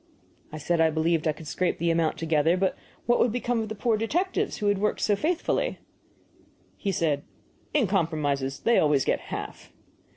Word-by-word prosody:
I 155 - -6
said 165 +2 0
I 160 - +5
believed 160 +1 +1
I - - +3
could 155 +1 -10
scrape 180 +4 -1
the 170 0 +1
amount 165 -1 +1
together, 160 +1 +2
but 190 0 +1 0.3
what 240 +1 +3
would 240 - +3
become 245 0 -1
of 220 - -4
the 220 - -4
poor 225 +1 +1
detectives 365 - -1
who 210 - -3
had 205 -1 +2
worked 210 +1 0
so 205 - +3
faithfully? 325 - -1 1.0
He 200 - -2
said: 155 -6 0 0.5
"In 290 -6 +3
compromises 150 -7 -1
they 235 - +4
always 145 -3 +3
get - - +1
half." - - -7
175 Hz, 185 wpm, -26 LUFS, 155-220 Hz, 1.0 s, I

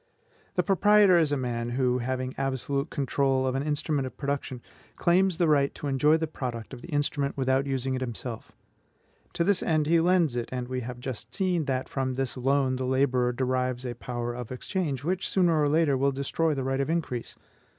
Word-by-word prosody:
The 180 - +2
proprietor 200 -1 +5
is 155 -3 +2
a 145 - +1
man 120 -2 -2
who, 125 0 +1
having 130 +1 -2
absolute 135 +2 -2
control 135 -2 +1
of 130 - 0
an 135 - -1
instrument 145 -1 -1
of - - -11
production, 140 -3 -3 0.4
claims 180 0 +2
the 175 -2 +2
right 140 -2 +2
to - - -7
enjoy 145 +3 +3
the 160 - -1
product 125 -7 -6
of - - -8
the - - -10
instrument 145 -3 -1
without 135 +1 +1
using 135 -1 -1
it 130 - -2
himself. 120 -1 -6 0.8
To 170 - +1
this 200 +1 +2
end 155 -2 +1
he 165 +2 +4
lends 170 -5 +3
it; 120 -1 -3
and 125 -1 -3
we 130 0 -3
have 125 +1 -6
just 125 -1 -6
seen 180 -5 0
that 130 -2 -1
from 130 -1 -2
this 135 -1 -2
loan 130 0 +1
the 130 0 -2
laborer 130 -2 +2
derives 130 0 -1
a 120 - -3
power 120 0 -4
of 125 -1 -7
exchange, 140 0 -3
which 180 +4 -1
sooner 170 -5 +3
or 145 - +3
later 155 -2 +3
will 140 +1 +2
destroy 145 +3 0
the 135 - -2
right 135 +1 0
of 140 - -2
increase. 160 -8 -2
135 Hz, 200 wpm, -27 LUFS, 130-155 Hz, 0.8 s, proprietor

